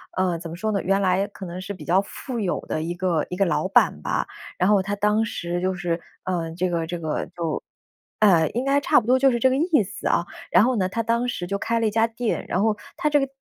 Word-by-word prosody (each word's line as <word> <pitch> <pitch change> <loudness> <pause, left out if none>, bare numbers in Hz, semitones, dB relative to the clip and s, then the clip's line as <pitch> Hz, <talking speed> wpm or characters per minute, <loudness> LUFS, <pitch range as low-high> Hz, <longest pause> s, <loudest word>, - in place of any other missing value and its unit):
呃， 185 -2 +1
怎 165 -1 -7
么 165 - -6
说 215 +5 -2
呢？ 200 - 0
原 195 +2 +2
来 190 +1 +2
可 200 -1 -9
能 175 +1 -6
是 200 +2 -5
比 185 - -10
较 185 +3 +3
富 235 +4 -6
有 195 -5 -1
的 155 - -2
一 170 - -2
个 175 -3 0
一 180 - -4
个 195 - +2
老 185 - 0
板 195 - +3
吧， - - -1 0.3
然 185 +2 +2
后 205 -2 +5
他 200 +2 -2
当 210 +2 +2
时 175 -4 -3
就 185 0 0
是， 175 -2 -2 0.2
呃， 170 -3 -2
这 185 +1 0
个 165 -2 -1
这 175 0 -4
个 160 -2 -2
就 165 -3 -2 0.6
呃， 175 -7 +5
应 245 - -1
该 275 +1 +3
差 285 - +4
不 220 - -11
多 255 +1 +5
就 270 0 +5
是 240 - 0
这 260 +3 +4
个 260 - +1
意 315 - +3
思 190 - -6
啊， 170 - +2 0.3
然 - - +6
后 255 +2 +2
呢， 185 -2 +1
他 230 +4 -2
当 235 +2 +1
时 175 -7 -3
就 200 - -1
开 230 +3 0
了 225 - +2
一 - - 0
家 225 +1 +3
店。 230 0 -2
然 185 - 0
后 215 -1 +2 0.2
他 300 - +1
这 290 - +4
个 275 - 0
195 Hz, 290 characters per minute, -24 LUFS, 175-230 Hz, 0.6 s, 然